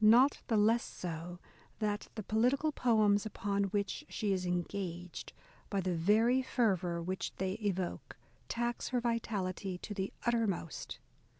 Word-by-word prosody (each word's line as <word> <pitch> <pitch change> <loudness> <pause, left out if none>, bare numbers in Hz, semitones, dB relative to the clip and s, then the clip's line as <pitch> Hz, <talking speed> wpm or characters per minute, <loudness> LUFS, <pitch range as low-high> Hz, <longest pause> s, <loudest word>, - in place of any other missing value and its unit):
Not 245 +6 +7
the 225 - +2
less 225 +3 +4
so, 175 0 -5 0.4
that 210 -1 -1
the 215 - -4
political 250 +9 +2
poems 215 -6 +3
upon 200 -2 -1
which 200 +6 -1
she 205 -3 0
is 185 -1 -1
engaged, 180 0 -3 0.4
by 200 - 0
the 185 -1 0
very 220 +9 +4
fervour 185 -9 +1
which 185 +2 -3
they 190 0 -1
evoke, 190 -3 -2 0.3
tax 240 0 -1
her 250 - +1
vitality 200 -6 -1
to 205 - -6
the 195 -1 -2
uttermost. 225 -9 -1
205 Hz, 135 wpm, -34 LUFS, 185-230 Hz, 0.4 s, Not